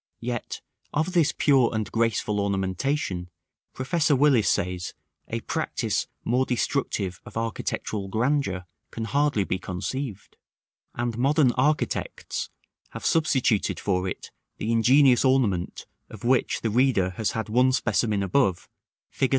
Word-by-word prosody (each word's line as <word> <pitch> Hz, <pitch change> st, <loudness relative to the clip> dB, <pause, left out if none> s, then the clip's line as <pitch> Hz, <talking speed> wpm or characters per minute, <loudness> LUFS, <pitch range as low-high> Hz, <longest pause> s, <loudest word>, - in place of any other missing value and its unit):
Yet, 120 Hz, -1 st, -4 dB, 0.3 s
of 160 Hz, +5 st, 0 dB
this 165 Hz, -3 st, +3 dB
pure 135 Hz, -5 st, +3 dB
and 110 Hz, -3 st, -3 dB
graceful 115 Hz, -2 st, 0 dB
ornamentation, 95 Hz, 0 st, -1 dB, 0.5 s
Professor 150 Hz, +3 st, +1 dB
Willis 130 Hz, -6 st, +4 dB
says, 90 Hz, 0 st, -1 dB, 0.3 s
"a -, -, -3 dB
practice -, -, -2 dB, 0.2 s
more 125 Hz, +3 st, +2 dB
destructive 115 Hz, -, -1 dB
of -, -, -9 dB
architectural 110 Hz, -2 st, -3 dB
grandeur 110 Hz, -4 st, 0 dB, 0.2 s
can 115 Hz, -, -5 dB
hardly 140 Hz, -4 st, +1 dB
be 95 Hz, -1 st, -2 dB
conceived:" 100 Hz, +4 st, -5 dB, 0.6 s
and 120 Hz, -1 st, -2 dB
modern 140 Hz, 0 st, +4 dB
architects 145 Hz, +5 st, -1 dB, 0.4 s
have -, -, -7 dB
substituted 130 Hz, -, +2 dB
for 95 Hz, -2 st, 0 dB
it -, -, -6 dB, 0.3 s
the 110 Hz, -, -2 dB
ingenious 125 Hz, +3 st, +5 dB
ornament 120 Hz, -10 st, +1 dB, 0.2 s
of 110 Hz, -, -11 dB
which 125 Hz, +1 st, +1 dB
the 110 Hz, -, -1 dB
reader 120 Hz, -6 st, +2 dB
has 105 Hz, +1 st, -2 dB
had 110 Hz, -, -3 dB
one 125 Hz, +4 st, +3 dB
specimen 110 Hz, -5 st, +1 dB
above, 95 Hz, -2 st, +1 dB, 0.4 s
Fig. 135 Hz, -, 0 dB
115 Hz, 125 wpm, -25 LUFS, 100-135 Hz, 0.6 s, ingenious